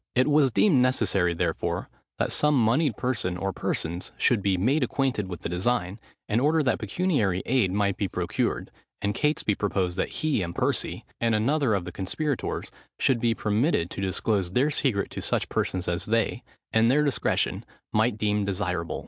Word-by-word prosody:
It 130 Hz, +1 st, +4 dB
was 145 Hz, -2 st, +4 dB
deemed 140 Hz, -, +4 dB
necessary, 100 Hz, -9 st, +2 dB
therefore, -, -, -2 dB, 0.3 s
that -, -, 0 dB
some 150 Hz, 0 st, +3 dB
monied 125 Hz, +2 st, +2 dB
person 110 Hz, -8 st, -1 dB
or 95 Hz, +2 st, -2 dB
persons 85 Hz, +3 st, -3 dB
should 120 Hz, -5 st, +3 dB
be 95 Hz, -1 st, +1 dB
made 130 Hz, -, +2 dB
acquainted 130 Hz, -5 st, 0 dB
with 90 Hz, -2 st, -7 dB
the -, -, -3 dB
design, 95 Hz, +2 st, -1 dB, 0.3 s
in 110 Hz, +2 st, +1 dB
order 155 Hz, +4 st, +3 dB
that 130 Hz, -, +1 dB
pecuniary 110 Hz, -, 0 dB
aid 120 Hz, -8 st, +2 dB
might 100 Hz, 0 st, 0 dB
be 100 Hz, -, 0 dB
procured: -, -, -2 dB, 0.3 s
and 100 Hz, 0 st, -1 dB
Catesby 150 Hz, -5 st, +1 dB
proposed 95 Hz, -3 st, -1 dB
that -, -, 0 dB
he 150 Hz, -8 st, +1 dB
and 85 Hz, -1 st, -4 dB
Percy, -, -, -1 dB
and 115 Hz, -1 st, +2 dB
another 125 Hz, +1 st, +2 dB
of 95 Hz, -3 st, -2 dB
the 90 Hz, -, -6 dB
conspirators, 130 Hz, -, -3 dB, 0.3 s
should 130 Hz, -3 st, +2 dB
be 115 Hz, -1 st, +1 dB
permitted 105 Hz, -, +1 dB
to -, -, -5 dB
disclose 95 Hz, -1 st, 0 dB
their 140 Hz, +7 st, +2 dB
secret 120 Hz, -9 st, 0 dB
to -, -, -5 dB
such -, -, -1 dB
persons 90 Hz, -1 st, -1 dB
as 85 Hz, 0 st, -1 dB
they, 115 Hz, +1 st, 0 dB, 0.3 s
in 110 Hz, +1 st, +4 dB
their 145 Hz, +5 st, +4 dB
discretion, 140 Hz, -3 st, 0 dB, 0.3 s
might 110 Hz, +1 st, +2 dB
deem 105 Hz, -1 st, +1 dB
desirable. 90 Hz, -4 st, -2 dB
110 Hz, 175 wpm, -26 LUFS, 95-130 Hz, 0.3 s, It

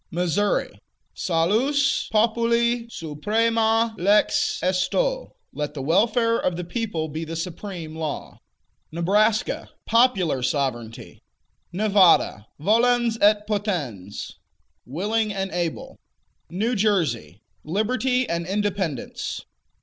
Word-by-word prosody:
Missouri 180 Hz, +4 st, -1 dB, 0.3 s
Salus 230 Hz, -, +1 dB
populi 235 Hz, +2 st, +2 dB
suprema 225 Hz, +7 st, 0 dB
lex 210 Hz, -, +2 dB
esto: -, -, 0 dB, 0.2 s
Let 150 Hz, 0 st, -4 dB
the 135 Hz, -, -4 dB
welfare 230 Hz, -, +2 dB
of 180 Hz, -, -1 dB
the 180 Hz, -, -3 dB
people 175 Hz, -4 st, -3 dB
be 155 Hz, +2 st, -5 dB
the 165 Hz, +1 st, -6 dB
supreme 170 Hz, -1 st, -6 dB
law. 160 Hz, -2 st, -5 dB, 0.5 s
Nebraska 205 Hz, +7 st, +1 dB, 0.2 s
Popular 195 Hz, -, +2 dB
Sovereignty. 125 Hz, -4 st, -3 dB, 0.5 s
Nevada 185 Hz, -, +3 dB
Volens 235 Hz, +5 st, +2 dB
et 210 Hz, 0 st, +4 dB
potens: 165 Hz, -, -4 dB, 0.5 s
Willing 210 Hz, -, -1 dB
and 195 Hz, -1 st, -3 dB
able. 170 Hz, -2 st, -4 dB, 0.5 s
New 215 Hz, +8 st, -1 dB
Jersey 145 Hz, -, 0 dB, 0.2 s
Liberty 250 Hz, -, 0 dB
and 170 Hz, 0 st, -2 dB
Independence. 195 Hz, -, -3 dB
200 Hz, 95 wpm, -23 LUFS, 165-225 Hz, 0.5 s, et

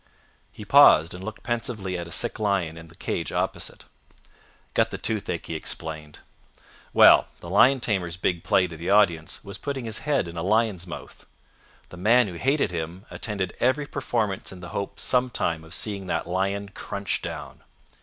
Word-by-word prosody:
He -, -, -10 dB
paused 80 Hz, +3 st, +7 dB
and 90 Hz, +1 st, -8 dB
looked 110 Hz, +2 st, -7 dB
pensively 115 Hz, -5 st, -2 dB
at 85 Hz, -1 st, -4 dB
a -, -, -11 dB
sick -, -, +1 dB
lion 100 Hz, -6 st, 0 dB
in 80 Hz, 0 st, -11 dB
the 85 Hz, -, -17 dB
cage -, -, -3 dB
opposite. -, -, -3 dB, 0.9 s
"Got -, -, +2 dB
the -, -, -5 dB
toothache," 100 Hz, -6 st, -2 dB
he -, -, -5 dB
explained. 80 Hz, -1 st, -4 dB, 0.7 s
"Well, -, -, +7 dB
the 85 Hz, -, -9 dB
lion 130 Hz, +7 st, +5 dB
tamer's 90 Hz, -7 st, -1 dB
big 85 Hz, -1 st, -1 dB
play 95 Hz, -, +3 dB
to 85 Hz, -2 st, -7 dB
the 85 Hz, +3 st, -5 dB
audience 85 Hz, -6 st, +2 dB
was 100 Hz, 0 st, -7 dB
putting 140 Hz, -4 st, -4 dB
his 110 Hz, -1 st, -4 dB
head 145 Hz, -, 0 dB
in 85 Hz, 0 st, -8 dB
a -, -, -2 dB
lion's 100 Hz, -2 st, +1 dB
mouth. 85 Hz, -, -10 dB, 0.6 s
The 90 Hz, -, -11 dB
man 115 Hz, +6 st, +4 dB
who 90 Hz, -, -6 dB
hated 135 Hz, -, +1 dB
him 85 Hz, +4 st, -5 dB
attended 100 Hz, -5 st, -3 dB
every 130 Hz, +4 st, +2 dB
performance 110 Hz, -8 st, -2 dB
in 95 Hz, -, -10 dB
the 85 Hz, -2 st, -9 dB
hope 100 Hz, +4 st, -5 dB
sometime 125 Hz, -10 st, +1 dB
of 80 Hz, -, -14 dB
seeing 100 Hz, -1 st, -2 dB
that -, -, -1 dB
lion 100 Hz, +3 st, -1 dB
crunch 100 Hz, 0 st, -4 dB
down. -, -, -7 dB
95 Hz, 175 wpm, -25 LUFS, 85-110 Hz, 0.9 s, paused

